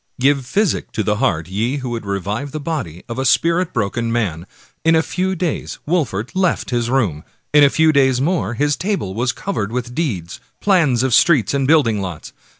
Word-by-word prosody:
Give 140 +1 +3
physic 200 - 0
to 110 - -1
the 105 +1 0
heart, 80 -5 0
ye 110 +9 -1
who 130 -3 -5
would 115 -3 -5
revive 100 +8 -3
the 155 - -3
body 140 - -4
of 120 +1 -5
a - - 0
spirit 165 +7 +2
broken 115 +1 -1
man! 95 -7 -2 0.4
In 165 0 +4
a 160 - +3
few 190 +2 -2
days 175 -3 -3
Wolfert 135 - -1
left 185 -6 0
his 120 -1 0
room; 105 - 0 0.3
in 150 0 +7
a 140 - +7
few 160 +2 +3
days 130 -3 +3
more 140 - 0
his 145 +3 +1
table 185 - -2
was 120 +4 0
covered 110 - -3
with 120 0 -4
deeds, 100 - -3 0.2
plans 160 - +3
of 130 -2 +1
streets 145 - +4
and 135 -1 +1
building 130 -10 +3
lots. 90 -5 -7
130 Hz, 195 wpm, -19 LUFS, 110-160 Hz, 0.4 s, in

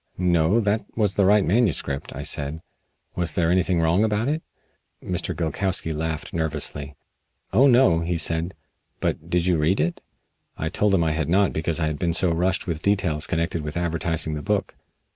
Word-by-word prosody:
"No, 90 +3 +3
that 105 0 +1
was 105 -4 +2
the 100 - +2
right 105 +1 +4
manuscript," 95 - 0
I 70 - -5
said. 75 +1 -3 0.5
"Was 90 -1 -1
there 85 -1 +2
anything 90 -1 +2
wrong 85 +5 +3
about 110 +2 0
it?" 155 +2 -1 0.6
Mr. - - -3
Gilkowsky 85 0 -1
laughed 80 0 -4
nervously. 75 -3 -3 0.6
"Oh, 130 +8 +6
no!" 120 -10 +5
he 85 +1 -1
said. 80 +2 -1 0.4
"But 80 - -2
did 85 -1 +1
you 90 -2 +2
read 80 +5 +1
it?" 85 +3 -1 0.6
I 80 - -2
told 100 +3 +2
him 85 - +2
I 80 - +1
had 80 -1 -1
not 95 +2 +3
because 80 +1 -2
I 80 - +1
had 75 -1 -2
been 85 -2 0
so 85 +1 +1
rushed 90 +3 0
with 85 -3 -3
details 95 -7 0
connected 85 0 -1
with 75 +2 -5
advertising 85 -2 -1
the 75 - -4
book. - - -1
85 Hz, 180 wpm, -24 LUFS, 80-95 Hz, 0.6 s, Oh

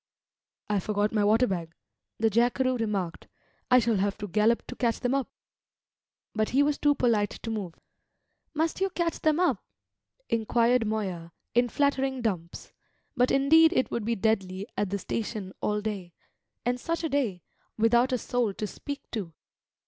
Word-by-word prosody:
"I 210 -1 +1
forgot 210 +2 0
my 210 -2 +2
water 220 +4 +4
bag," 170 -6 -4 0.4
the 225 0 +2
jackeroo 245 +3 +2
remarked. 205 -7 -3 0.4
"I 250 - +7
shall 230 -3 +2
have 195 +1 0
to 205 - -5
gallop 215 +4 +2
to 250 - -8
catch 235 -3 0
them 250 +1 0
up." 275 -2 0 1.0
But 215 -1 0
he 275 +3 +3
was 290 0 0
too 290 -1 +3
polite 225 -6 +2
to 225 - -6
move. 195 -6 -4 0.8
"Must 320 +4 0
you 390 - +2
catch 345 -2 -2
them 310 +1 +2
up?" 360 - +1 0.6
inquired 230 +1 +2
Moya, 185 -6 -3 0.2
in 245 +1 +3
flattering 270 -1 0
dumps: 175 -6 -4 0.4
but 250 -1 +3
indeed 320 +5 +5
it 260 - +1
would 235 - -2
be 230 +1 +1
deadly 195 -2 0
at 205 - -1
the 200 - -1
station 210 -2 -4
all 210 0 0
day, 200 -5 -5 0.5
and 245 +1 0
such 335 +5 -2
a 325 - 0
day, 235 - -1 0.3
without 235 +3 +3
a 255 - +2
soul 235 -4 -1
to 215 - -3
speak 285 +7 -7
to! 185 -8 -5
225 Hz, 165 wpm, -28 LUFS, 205-255 Hz, 1.0 s, I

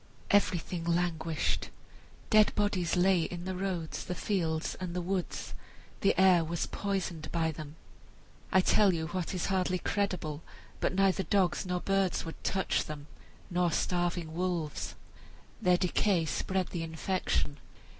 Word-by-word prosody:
Everything 180 -4 +2
languished; 170 -2 0 0.6
dead 215 -1 +6
bodies 190 -5 +1
lay 180 0 +4
in 175 +2 -4
the 185 - -2
roads, 180 -4 -3
the 180 - -4
fields, 165 -4 -1
and 180 -2 -4
the - - 0
woods; 185 0 -3 0.5
the 195 -2 +2
air 185 -3 +6
was 165 +1 -2
poisoned 190 -5 -3
by 165 -1 +1
them, 155 -1 -8 0.8
I 190 - +6
tell 195 0 +4
you 160 0 -3
what 185 +1 -3
is 180 - -1
hardly 185 -1 +1
credible, 180 -6 -1 0.4
but - - 0
neither 195 0 +3
dogs 190 -1 +1
nor 180 -1 -1
birds 195 -3 +1
would 165 - -8
touch 190 -1 +1
them, 150 -2 -7 0.5
nor 175 -1 +2
starving 175 -1 0
wolves. 170 -3 -2 0.7
Their 180 -1 +4
decay 180 -1 +2
spread 185 +3 -1
the 170 - -3
infection. 160 -3 -1
180 Hz, 140 wpm, -31 LUFS, 165-190 Hz, 0.8 s, dead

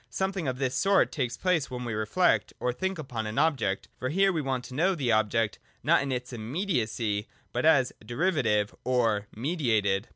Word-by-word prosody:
— - - -43
Something 190 -5 -1
of 130 -1 -1
this 130 -1 -1
sort 195 +9 +3
takes 125 -6 -2
place 180 -6 +1
when 125 -1 -5
we 115 - -3
reflect, 110 - +1
or 125 - 0
think 190 +6 -2
upon 120 -8 -4
an 110 - -5
object; 135 -11 +1
for 130 - -2
here 195 +5 +3
we 160 - 0
want 130 -3 -2
to 130 - -10
know 180 +8 +2
the 130 -7 0
object, 110 0 +1 0.2
not - - +4
in 140 -1 -2
its 125 0 -4
immediacy, 115 - -1 0.3
but - - +1
as - - +4
derivative 120 - +1
or 115 -5 +1
mediated. 110 - 0
125 Hz, 190 wpm, -28 LUFS, 110-160 Hz, 0.3 s, not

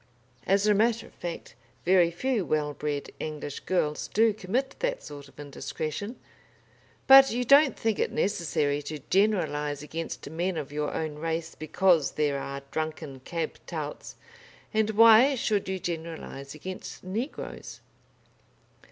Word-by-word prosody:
As 195 +2 +3
a 210 - +5
matter 225 +2 +2
of - - -17
fact, 175 -1 -7 0.3
very 180 -1 +5
few 225 +5 -1
well 150 -2 -1
bred 145 0 -4
English 150 -2 -5
girls 150 -5 -1
do 220 0 +3
commit 225 +7 -2
that - - -2
sort 145 -1 -9
of 140 - -20
indiscretion. 155 - -5 0.9
But 270 0 +9
you 245 +1 -1
don't 280 +2 +6
think 225 -2 0
it - - 0
necessary 155 -6 0
to 150 +1 -6
generalise 155 -8 +1
against 165 0 -6
men 170 +4 -2
of 145 -2 -5
your 150 0 -2
own 155 -2 -4
race 165 0 -3
because 165 -1 +2
there 145 -2 0
are 140 0 -6
drunken 155 -3 -4
cab 165 +5 -4
touts, - - -6 0.6
and 220 0 +2
why 230 +5 +7
should 210 -5 0
you 190 - -1
generalise 160 -5 -6
against 185 +5 -8
negroes? 220 +10 -5
170 Hz, 140 wpm, -27 LUFS, 150-215 Hz, 0.9 s, But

